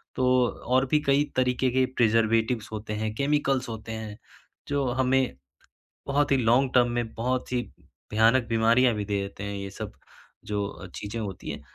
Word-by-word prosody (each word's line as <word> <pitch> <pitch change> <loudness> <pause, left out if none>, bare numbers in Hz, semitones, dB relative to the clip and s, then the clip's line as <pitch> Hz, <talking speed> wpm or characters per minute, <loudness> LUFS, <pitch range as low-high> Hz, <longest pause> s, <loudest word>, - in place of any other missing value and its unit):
तो 130 - +1 0.2
और 130 +3 0
भी 150 - +6
कई 140 +1 +4
तरीके 130 0 +2
के 130 +1 +3
प्रिज़र्वेटिव्स 115 0 +2
होते 105 0 -5
हैं, 110 0 -2
केमिकल्स 140 -2 +1
होते 110 0 -7
हैं, 110 -2 -6 0.5
जो 140 -1 0 0.2
हमें 130 - +1 0.7
बहुत 145 +1 +1
ही - - +4
लॉन्ग 125 +2 +3
टर्म 120 -1 +5
में 115 -2 -4
बहुत 125 +3 -2
ही 125 - +1 0.5
भयानक 115 +3 +4
बीमारियाँ 115 +2 +4
भी 105 -1 -3
दे 100 -1 -1
देते 100 0 -7
हैं 100 0 -4
ये 100 0 -5
सब - - -5 0.5
जो 100 -2 -4
चीज़ें 105 +3 -5
होती 100 -4 -6
हैं। 75 - -7
115 Hz, 170 wpm, -26 LUFS, 105-130 Hz, 0.7 s, भी